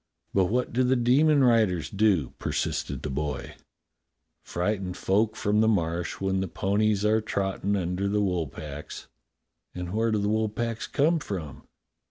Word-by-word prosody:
"But 95 Hz, -1 st, +4 dB
what 125 Hz, +6 st, -1 dB
do 130 Hz, +2 st, +2 dB
the 130 Hz, +1 st, +3 dB
demon 140 Hz, +4 st, +4 dB
riders 110 Hz, -9 st, +3 dB
do.^^ 100 Hz, -, +2 dB
" -, -, -45 dB
persisted -, -, -2 dB
the -, -, -3 dB
boy. 75 Hz, +2 st, -3 dB, 0.9 s
"Frighten 90 Hz, 0 st, -2 dB
folk 105 Hz, +4 st, +1 dB
from 105 Hz, +1 st, +1 dB
the 110 Hz, -, +4 dB
Marsh 85 Hz, -5 st, 0 dB
when 95 Hz, 0 st, 0 dB
the 95 Hz, -, -1 dB
ponies 105 Hz, +2 st, +1 dB
are 110 Hz, +1 st, +3 dB
trottin' 100 Hz, -1 st, -1 dB
under 90 Hz, +1 st, -1 dB
the 105 Hz, +1 st, +1 dB
wool 90 Hz, -6 st, 0 dB
packs." 75 Hz, +1 st, -8 dB, 0.7 s
"And 90 Hz, 0 st, -5 dB
where 115 Hz, +1 st, +1 dB
do 110 Hz, -, +2 dB
the 100 Hz, 0 st, 0 dB
wool 110 Hz, +1 st, +1 dB
packs 115 Hz, +1 st, -3 dB
come 160 Hz, +4 st, +2 dB
from?" 90 Hz, -, -6 dB
100 Hz, 165 wpm, -27 LUFS, 90-110 Hz, 0.9 s, But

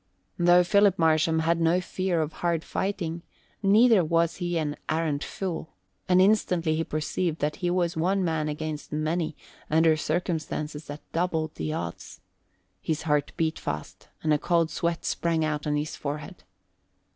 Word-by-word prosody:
Though 175 Hz, +1 st, +6 dB
Philip 200 Hz, +1 st, +4 dB
Marsham 160 Hz, 0 st, +3 dB
had 165 Hz, +1 st, +1 dB
no 165 Hz, +2 st, +3 dB
fear 180 Hz, -2 st, -1 dB
of 155 Hz, +1 st, -6 dB
hard 170 Hz, -2 st, -1 dB
fighting, 175 Hz, -4 st, -3 dB, 0.4 s
neither 215 Hz, 0 st, +5 dB
was 165 Hz, +1 st, +1 dB
he 175 Hz, -1 st, -1 dB
an 150 Hz, -2 st, -1 dB
arrant 155 Hz, -2 st, 0 dB
fool, 175 Hz, -4 st, -5 dB, 0.3 s
and 180 Hz, 0 st, +5 dB
instantly 180 Hz, -5 st, +3 dB
he 165 Hz, -, 0 dB
perceived 160 Hz, +2 st, -2 dB
that 150 Hz, -1 st, -1 dB
he 180 Hz, -2 st, -1 dB
was 175 Hz, -1 st, 0 dB
one 185 Hz, +4 st, +1 dB
man 160 Hz, -2 st, 0 dB
against 150 Hz, 0 st, -5 dB
many 155 Hz, +1 st, -1 dB, 0.3 s
under 160 Hz, 0 st, +4 dB
circumstances 155 Hz, -2 st, -3 dB
that 145 Hz, +1 st, -8 dB
doubled 160 Hz, -2 st, -1 dB
the 80 Hz, -1 st, -3 dB
odds. 85 Hz, 0 st, -6 dB, 0.6 s
His 160 Hz, -1 st, -2 dB
heart 150 Hz, -2 st, +1 dB
beat 160 Hz, -1 st, 0 dB
fast 95 Hz, +6 st, -6 dB, 0.2 s
and 155 Hz, -1 st, +3 dB
a 150 Hz, -, +2 dB
cold 170 Hz, -1 st, +1 dB
sweat 170 Hz, -1 st, -2 dB
sprang 165 Hz, -2 st, 0 dB
out 150 Hz, -1 st, -2 dB
on 150 Hz, -, +1 dB
his 150 Hz, +1 st, -2 dB
forehead. 150 Hz, +5 st, -6 dB
160 Hz, 155 wpm, -27 LUFS, 155-175 Hz, 0.6 s, Though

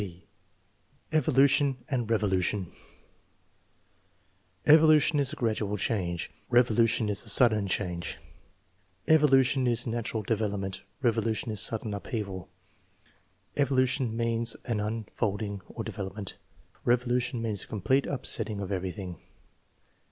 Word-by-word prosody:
(b) 90 Hz, -3 st, -8 dB, 0.9 s
Evolution 140 Hz, -3 st, +3 dB
and 120 Hz, -5 st, -2 dB
revolution. 100 Hz, -3 st, 0 dB, 1.0 s
" 95 Hz, +11 st, -1 dB
Evolution 155 Hz, -1 st, +5 dB
is 140 Hz, -2 st, +1 dB
a -, -, -5 dB
gradual 110 Hz, -5 st, -1 dB
change; 90 Hz, -5 st, -2 dB, 0.2 s
revolution 115 Hz, -2 st, +3 dB
is 100 Hz, -1 st, 0 dB
a 110 Hz, -, -4 dB
sudden 110 Hz, -2 st, +5 dB
change." 90 Hz, -3 st, -2 dB, 0.5 s
" 95 Hz, +1 st, -40 dB
Evolution 135 Hz, -3 st, +4 dB
is 120 Hz, 0 st, +1 dB
natural 115 Hz, -1 st, -3 dB
develop 105 Hz, -1 st, -1 dB
ment; 95 Hz, -1 st, -5 dB, 0.2 s
revolution 115 Hz, -1 st, 0 dB
is 105 Hz, -, -2 dB
sudden 110 Hz, -1 st, 0 dB
upheaval." 100 Hz, -3 st, -5 dB, 1.1 s
"Evolution 130 Hz, -3 st, +1 dB
means 115 Hz, 0 st, 0 dB
an 115 Hz, -3 st, -1 dB
un 110 Hz, +1 st, -3 dB
folding 100 Hz, -2 st, -2 dB
or -, -, -6 dB
development; 95 Hz, +1 st, -6 dB, 0.5 s
revolution 120 Hz, 0 st, +1 dB
means 110 Hz, -4 st, -1 dB
a -, -, -8 dB
complete 130 Hz, +7 st, +1 dB
upsetting 110 Hz, -5 st, -2 dB
of 100 Hz, -1 st, -5 dB
everything." 95 Hz, -1 st, -4 dB
110 Hz, 115 wpm, -28 LUFS, 100-125 Hz, 1.1 s, Evolution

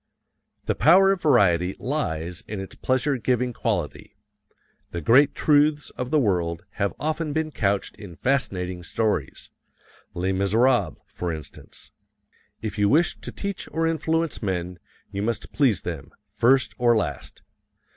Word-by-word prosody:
The -, -, +1 dB
power 190 Hz, +5 st, +5 dB
of 195 Hz, -3 st, -1 dB
variety 95 Hz, -, +3 dB
lies 90 Hz, -, -3 dB
in 105 Hz, -, -5 dB
its 95 Hz, -, -7 dB
pleasure 130 Hz, +2 st, 0 dB
giving 125 Hz, +1 st, 0 dB
quality. -, -, -3 dB, 0.7 s
The 85 Hz, -, -4 dB
great 130 Hz, -, +4 dB
truths 150 Hz, 0 st, +2 dB
of 125 Hz, 0 st, -5 dB
the 155 Hz, -, +2 dB
world 85 Hz, -, 0 dB, 0.2 s
have 100 Hz, -, 0 dB
often 155 Hz, 0 st, -2 dB
been 160 Hz, 0 st, -1 dB
couched 100 Hz, -6 st, -1 dB
in 100 Hz, -5 st, -10 dB
fascinating 95 Hz, -, -1 dB
stories 110 Hz, +5 st, -2 dB, 0.6 s
"Les 90 Hz, +2 st, -1 dB
Miserables," 100 Hz, -, +2 dB
for 90 Hz, -1 st, -4 dB
instance. 80 Hz, -2 st, -9 dB, 0.7 s
If 110 Hz, -1 st, -4 dB
you 100 Hz, 0 st, +3 dB
wish 165 Hz, +5 st, +3 dB
to -, -, -7 dB
teach 200 Hz, -1 st, -5 dB
or 165 Hz, 0 st, 0 dB
influence 165 Hz, 0 st, -1 dB
men, 90 Hz, -3 st, -3 dB, 0.3 s
you 100 Hz, -, -3 dB
must 115 Hz, +3 st, -3 dB
please 125 Hz, -, +2 dB
them, 80 Hz, -6 st, -6 dB, 0.2 s
first 120 Hz, +5 st, +3 dB
or 120 Hz, -1 st, +4 dB
last. -, -, -4 dB
115 Hz, 140 wpm, -24 LUFS, 90-145 Hz, 0.7 s, power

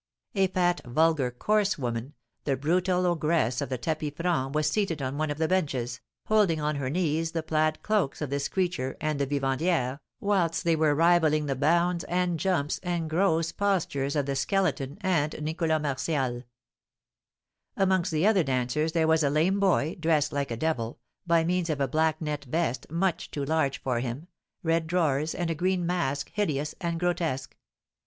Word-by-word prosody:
A 195 Hz, -2 st, +3 dB
fat, 175 Hz, -1 st, +1 dB
vulgar, 150 Hz, +1 st, +2 dB
coarse 205 Hz, -, +1 dB
woman, 120 Hz, 0 st, -4 dB, 0.3 s
the 140 Hz, -2 st, +1 dB
brutal 180 Hz, +5 st, +1 dB
ogress 155 Hz, -7 st, +1 dB
of 140 Hz, -, -3 dB
the 130 Hz, -, -2 dB
tapis 155 Hz, +2 st, -2 dB
franc, 160 Hz, -6 st, -1 dB
was 155 Hz, 0 st, +2 dB
seated 175 Hz, -2 st, 0 dB
on 130 Hz, 0 st, -3 dB
one 155 Hz, 0 st, 0 dB
of 145 Hz, -, -3 dB
the 160 Hz, 0 st, +1 dB
benches, 130 Hz, -9 st, -1 dB, 0.2 s
holding 205 Hz, -7 st, +3 dB
on 150 Hz, -1 st, -1 dB
her 135 Hz, -2 st, -2 dB
knees 160 Hz, 0 st, 0 dB
the 165 Hz, -1 st, -2 dB
plaid 155 Hz, 0 st, 0 dB
cloaks 210 Hz, -10 st, 0 dB
of 150 Hz, -3 st, -4 dB
this 140 Hz, 0 st, -1 dB
creature 175 Hz, -9 st, -2 dB
and 155 Hz, -1 st, -1 dB
the 140 Hz, -, 0 dB
vivandière, 135 Hz, 0 st, 0 dB, 0.2 s
whilst 190 Hz, -7 st, +1 dB
they 170 Hz, -2 st, +3 dB
were 155 Hz, -2 st, +2 dB
rivalling 160 Hz, -2 st, +3 dB
the 135 Hz, -2 st, -1 dB
bounds, 170 Hz, +5 st, +2 dB
and 175 Hz, -1 st, 0 dB
jumps, 170 Hz, -6 st, 0 dB
and 170 Hz, -3 st, -2 dB
gross 165 Hz, -2 st, +2 dB
postures 160 Hz, -9 st, 0 dB
of 145 Hz, -2 st, +1 dB
the 140 Hz, 0 st, -2 dB
Skeleton 150 Hz, -5 st, 0 dB
and 170 Hz, -7 st, 0 dB
Nicholas 160 Hz, +1 st, 0 dB
Martial. 135 Hz, -3 st, -2 dB, 1.3 s
Amongst 190 Hz, -2 st, +2 dB
the 155 Hz, +3 st, +1 dB
other 210 Hz, -3 st, +5 dB
dancers 135 Hz, +3 st, 0 dB
there 165 Hz, -2 st, +2 dB
was 160 Hz, 0 st, +4 dB
a 140 Hz, -, +3 dB
lame 165 Hz, +7 st, +2 dB
boy, 175 Hz, -5 st, +2 dB
dressed 160 Hz, -3 st, +1 dB
like 140 Hz, -1 st, -1 dB
a 115 Hz, -, -3 dB
devil, 120 Hz, -6 st, -2 dB, 0.3 s
by 170 Hz, -1 st, +4 dB
means 175 Hz, 0 st, 0 dB
of 150 Hz, -2 st, -1 dB
a 140 Hz, -, +1 dB
black 155 Hz, +3 st, +1 dB
net 150 Hz, -3 st, -3 dB
vest, 130 Hz, -3 st, -1 dB
much 175 Hz, +3 st, -1 dB
too 140 Hz, -2 st, -3 dB
large 140 Hz, -3 st, 0 dB
for 125 Hz, -3 st, -1 dB
him, 130 Hz, +8 st, -5 dB, 0.3 s
red 165 Hz, -1 st, +1 dB
drawers, 160 Hz, -3 st, +1 dB
and 175 Hz, -2 st, -1 dB
a -, -, +1 dB
green 180 Hz, +2 st, 0 dB
mask 145 Hz, -6 st, -1 dB
hideous 150 Hz, -8 st, -1 dB
and 170 Hz, -2 st, -2 dB
grotesque. 165 Hz, -6 st, -1 dB
160 Hz, 175 wpm, -27 LUFS, 140-175 Hz, 1.3 s, other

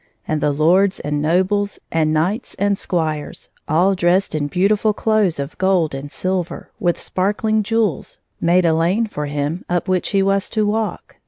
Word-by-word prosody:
And 155 Hz, -1 st, -1 dB
the -, -, +2 dB
lords 180 Hz, +7 st, +3 dB
and 145 Hz, 0 st, -2 dB
nobles, 190 Hz, +6 st, +1 dB
and 155 Hz, -1 st, +1 dB
knights 180 Hz, +10 st, -1 dB
and 200 Hz, +1 st, +1 dB
squires, 160 Hz, -6 st, -3 dB, 0.2 s
all 175 Hz, +6 st, +3 dB
dressed 180 Hz, +1 st, +1 dB
in 145 Hz, -2 st, -1 dB
beautifiil 205 Hz, +5 st, +2 dB
clothes 215 Hz, -7 st, +1 dB
of 140 Hz, +1 st, -5 dB
gold 185 Hz, -5 st, +2 dB
and 140 Hz, +2 st, -6 dB
silver, 185 Hz, -2 st, -3 dB
with 175 Hz, -5 st, 0 dB
sparkling 210 Hz, +3 st, 0 dB
jewels, 215 Hz, -, -1 dB, 0.2 s
made 175 Hz, +1 st, +3 dB
a 165 Hz, -, +4 dB
lane 175 Hz, +8 st, +1 dB
for 150 Hz, -9 st, -5 dB
him 145 Hz, +4 st, -3 dB
up 175 Hz, 0 st, -1 dB
which 185 Hz, -1 st, 0 dB
he 195 Hz, -2 st, +2 dB
was 195 Hz, 0 st, +1 dB
to 215 Hz, -2 st, 0 dB
walk. 215 Hz, +1 st, -3 dB
185 Hz, 170 wpm, -19 LUFS, 155-200 Hz, 0.2 s, a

